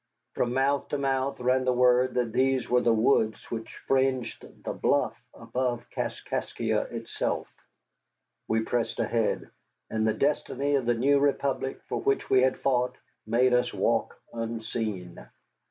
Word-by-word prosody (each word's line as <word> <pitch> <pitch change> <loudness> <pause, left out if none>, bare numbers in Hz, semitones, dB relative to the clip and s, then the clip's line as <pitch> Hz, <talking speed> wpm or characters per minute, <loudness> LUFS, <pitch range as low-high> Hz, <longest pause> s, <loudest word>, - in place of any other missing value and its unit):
From 120 0 -1
mouth 140 +1 +1
to 145 - -2
mouth 135 0 -1
ran 130 +1 +2
the 130 - +2
word 125 +1 +3
that 120 -2 0
these 130 -1 +2
were 125 0 +3
the 120 - +3
woods 110 -1 +2
which 115 -1 -5
fringed 130 -2 0 0.2
the - - -3
bluff - - +1 0.2
above 125 -2 -3
Kaskaskia - - -2
itself. - - -3 1.0
We 110 0 +1
pressed 120 0 -1
ahead, 115 -1 0 0.4
and 110 0 +1
the 110 - +2
destiny 145 -1 0
of 135 -4 +1
the 120 - +3
new 140 +4 +3
Republic 140 -1 0
for - - -2
which 135 - 0
we 130 -1 +6
had 130 0 +2
fought 125 -1 +1 0.3
made 125 +3 +3
us 125 0 +2
walk - - 0
unseen. 110 -5 -4
125 Hz, 145 wpm, -28 LUFS, 115-135 Hz, 1.0 s, we